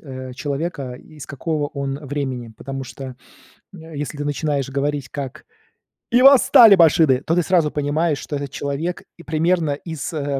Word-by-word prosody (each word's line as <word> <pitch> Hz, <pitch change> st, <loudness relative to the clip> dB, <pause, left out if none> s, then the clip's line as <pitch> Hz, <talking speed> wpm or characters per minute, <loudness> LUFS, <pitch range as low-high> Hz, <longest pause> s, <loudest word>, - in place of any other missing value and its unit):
э, 130 Hz, -3 st, -8 dB
человека, 140 Hz, -2 st, -4 dB
из 150 Hz, +2 st, -12 dB
какого 150 Hz, +1 st, -2 dB
он 140 Hz, -1 st, -4 dB
времени. 130 Hz, -4 st, -4 dB
Потому 135 Hz, 0 st, -6 dB
что, 130 Hz, 0 st, -9 dB, 0.6 s
э, 160 Hz, -3 st, -11 dB
если 145 Hz, +1 st, -4 dB
ты 145 Hz, -, -3 dB
начинаешь 145 Hz, -2 st, -1 dB
говорить, 140 Hz, -1 st, -2 dB
как: 140 Hz, +2 st, -7 dB, 0.7 s
"И 245 Hz, +1 st, +4 dB
восстали 250 Hz, -5 st, +8 dB
машины!", 160 Hz, -6 st, +4 dB
то 165 Hz, -, 0 dB
ты 175 Hz, -, +3 dB
сразу 165 Hz, -4 st, +2 dB
понимаешь, 150 Hz, +1 st, 0 dB
что 145 Hz, -, -5 dB
этот 140 Hz, -1 st, -6 dB
человек 150 Hz, +5 st, -4 dB
и 170 Hz, -, -13 dB
примерно 160 Hz, 0 st, +1 dB
из, 160 Hz, +2 st, -5 dB
э-э, 140 Hz, -3 st, -2 dB
145 Hz, 160 wpm, -21 LUFS, 135-160 Hz, 0.7 s, восстали